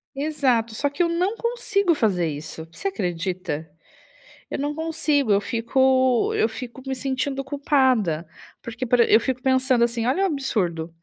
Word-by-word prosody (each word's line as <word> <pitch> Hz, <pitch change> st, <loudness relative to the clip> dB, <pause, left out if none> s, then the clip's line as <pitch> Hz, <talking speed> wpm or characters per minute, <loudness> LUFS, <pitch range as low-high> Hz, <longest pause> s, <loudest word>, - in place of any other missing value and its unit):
Exato. 270 Hz, -6 st, 0 dB
Só, 285 Hz, +5 st, 0 dB
que 285 Hz, -, -3 dB
eu 340 Hz, -, +3 dB
não 365 Hz, +6 st, 0 dB
consigo 425 Hz, -7 st, 0 dB
fazer 185 Hz, -, +1 dB
isso. 155 Hz, +2 st, -7 dB
Você 395 Hz, -, -4 dB
acredita? 175 Hz, -, -3 dB, 0.8 s
Eu -, -, -3 dB
não 290 Hz, +1 st, -1 dB
consigo, 310 Hz, -6 st, 0 dB
eu 200 Hz, 0 st, +4 dB
fico 260 Hz, +2 st, +2 dB
eu -, -, +3 dB
fico 250 Hz, +2 st, -8 dB
me 265 Hz, -, -1 dB
sentindo 270 Hz, +1 st, -2 dB
culpada. 260 Hz, -, +1 dB, 0.3 s
Porque, 235 Hz, +2 st, -5 dB
por 245 Hz, +1 st, +2 dB
e 235 Hz, -, +4 dB
eu 220 Hz, -, +8 dB
fico 255 Hz, +1 st, -3 dB
pensando 260 Hz, -2 st, +3 dB
assim, 235 Hz, -1 st, 0 dB
olha 320 Hz, +10 st, +1 dB
o -, -, +4 dB
absurdo. 180 Hz, -, -2 dB
260 Hz, 165 wpm, -23 LUFS, 220-285 Hz, 0.8 s, eu